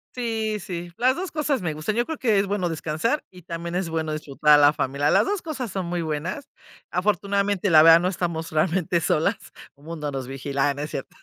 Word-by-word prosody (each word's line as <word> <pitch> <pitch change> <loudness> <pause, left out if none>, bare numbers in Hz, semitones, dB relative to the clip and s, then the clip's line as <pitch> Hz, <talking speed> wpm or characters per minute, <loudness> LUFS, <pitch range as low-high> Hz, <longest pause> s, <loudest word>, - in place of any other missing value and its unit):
Sí, 225 -3 -2
sí, 175 -2 -6
las 255 +2 +3
2 370 +3 -5
cosas 300 - -1
me 160 -3 -1
gustan, 155 +8 -3
yo 240 - +1
creo 320 +1 -5
que 225 -6 +2
es 200 - +2
bueno 190 -3 -1
descansar 165 - -1
y 180 - -14
también 170 0 -6
es 180 -1 -1
bueno 160 -1 -2
disfrutar 150 0 0
a 150 - +9
la 145 0 +6
familia. 140 0 -1
Las - - +4
2 400 -1 -1
cosas 265 - -5
son 190 -3 -3
muy 175 -1 -2
buenas. 160 - -4 0.4
Afortunadamente, 200 0 0
la 155 -1 +8
verdad, 165 +1 +8
no 180 +1 0
estamos 170 -3 -3
realmente 170 +2 +1
solas. 160 -1 +1 0.4
Un 145 +1 -21
mundo 155 -3 -5
nos 135 -2 -5
vigila, 135 +1 -1
ay, 140 - -1
no 145 - -4
es 150 - -6
cierto. 135 - -6
175 Hz, 225 wpm, -24 LUFS, 155-205 Hz, 0.4 s, a